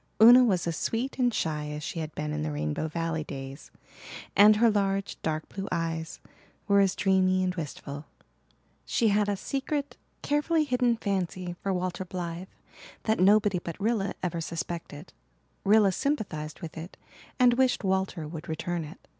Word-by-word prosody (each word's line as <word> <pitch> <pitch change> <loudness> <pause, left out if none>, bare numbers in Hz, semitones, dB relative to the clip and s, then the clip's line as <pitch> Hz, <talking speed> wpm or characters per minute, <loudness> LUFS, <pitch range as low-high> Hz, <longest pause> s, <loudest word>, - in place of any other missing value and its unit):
Una 240 +3 +9
was 190 -8 +2
as 170 -1 -1
sweet 250 +8 -2
and 245 -1 +3
shy 155 -7 -2
as 150 0 -5
she 170 0 -4
had 155 -2 -5
been 75 0 -3
in 75 - -2
the 75 0 -2
Rainbow 75 - -2
Valley 165 0 -2
days, 135 -1 -8 0.7
and 210 +2 +8
her 230 +1 +4
large, 195 -1 0
dark 155 -1 -2
blue 195 0 -6
eyes 165 -1 -3 0.5
were 200 -1 +5
as 195 -2 +3
dreamy 185 -1 +2
and 180 0 0
wistful. 145 -3 -6 0.8
She 230 -3 +1
had 205 0 +2
a 200 - 0
secret, 280 +5 -3 0.3
carefully 305 +2 +2
hidden 250 -4 +1
fancy 185 -4 -2
for 195 - -1
Walter 185 0 -2
Blythe 175 0 -5 0.6
that 220 0 +1
nobody 200 0 +4
but 170 0 -7
Rilla 210 -1 0
ever 170 -2 -2
suspected. 165 -1 -6 0.5
Rilla 205 -1 +5
sympathized 180 - -3
with 160 -1 -7
it 170 +3 -9 0.4
and 250 -2 +5
wished 255 -1 +2
Walter 190 -4 -1
would 160 +2 -8
return 170 +1 -2
it. 155 +4 -12
185 Hz, 165 wpm, -28 LUFS, 160-215 Hz, 0.8 s, Una